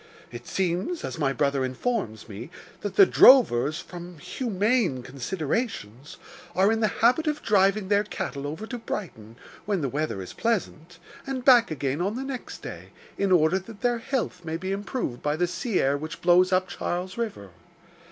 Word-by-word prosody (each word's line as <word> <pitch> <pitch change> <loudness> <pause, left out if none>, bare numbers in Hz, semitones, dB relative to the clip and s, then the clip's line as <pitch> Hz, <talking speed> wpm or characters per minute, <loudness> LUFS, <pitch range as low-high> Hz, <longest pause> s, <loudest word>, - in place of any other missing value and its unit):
It - - -9
seems, 190 - -1
as - - -5
my 140 -3 +2
brother 140 0 0
informs 130 - -3
me, 110 +6 -8 0.3
that 205 -2 -5
the 195 - +8
drovers, 155 - +6
from 175 0 -9
humane 205 - 0
considerations, 140 - -4 0.4
are 195 +3 +4
in 225 - +1
the 220 - +3 0.2
habit 280 +7 +4
of 300 0 -1
driving 195 -1 +3
their 205 +1 +3
cattle 145 -8 -5
over 160 +9 -5
to 245 +1 -6
Brighton, 115 - -6 0.3
(when 200 -4 0
the 140 - -1
weather 145 -6 -2
is 95 - -7
pleasant,) 180 -7 -2 0.3
and 260 -2 -4
back 245 -3 +7
again 145 0 -2
on 200 +4 -1
the 260 - -3
next 270 -2 -7
day, - - -8 0.3
in 200 -1 +1
order 175 +1 +4
that 205 +2 -13
their 240 -1 +1
health 225 -8 -3
may 160 0 -3
be 185 +3 -4
improved 200 - -3
by 150 0 0
the 175 +3 +1
sea 190 +5 -2
air 140 +1 +2
which 155 +1 -7
blows 180 +1 +5
up 185 0 +2
Charles 180 +2 -4
River. 210 - -5
185 Hz, 175 wpm, -26 LUFS, 145-225 Hz, 0.4 s, the